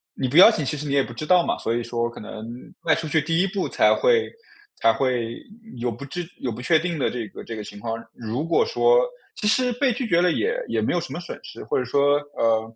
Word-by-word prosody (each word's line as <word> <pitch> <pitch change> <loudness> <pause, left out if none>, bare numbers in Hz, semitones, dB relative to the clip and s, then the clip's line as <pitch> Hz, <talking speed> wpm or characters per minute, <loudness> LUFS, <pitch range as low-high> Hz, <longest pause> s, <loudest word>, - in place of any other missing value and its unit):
你 130 - -1
不 145 +6 0
邀 190 - +11
请 190 -9 -1
其 150 - -2
实 150 - -5
你 140 - -1
也 140 -1 +4
不 120 - -8
知 155 - -5
道 180 +1 +4
嘛。 - - 0
所 115 - -2
以 120 - -1
说 120 0 -2
可 - - -11
能 110 +1 -8 0.4
迈 160 - +3
出 160 - -4
去 160 +1 +2
第 165 +4 +1
一 195 - +2
步 195 0 -2
才 - - +4
会 475 -2 +2 0.5
才 115 0 +4
会 120 -3 -1 0.4
有 120 0 -1
不 120 +5 -8
知 175 +6 -5
有 125 - -3
不 115 +3 -7
确 160 +4 +4
定 170 -1 -3
的 135 - +1
这 120 -3 -4
个 - - -10
这 115 - -7
个 105 - -5
情 105 - -10
况， 115 +1 -3 0.2
如 120 +6 -4
果 450 - +2
说 480 +1 +4 0.3
其 210 - -2
实 250 +3 +2
被 255 +1 +1
拒 245 +1 -3
绝 175 -4 +3
了 180 -1 +3
也 460 - 0
也 - - 0
没 - - 0
有 - - +2
什 - - -7
么 - - -4
损 - - -7
失。 - - -9
或 445 - -1
者 - - -1
说， 145 0 +3 0.2
呃， 115 0 +1
145 Hz, 290 characters per minute, -23 LUFS, 120-180 Hz, 0.5 s, 邀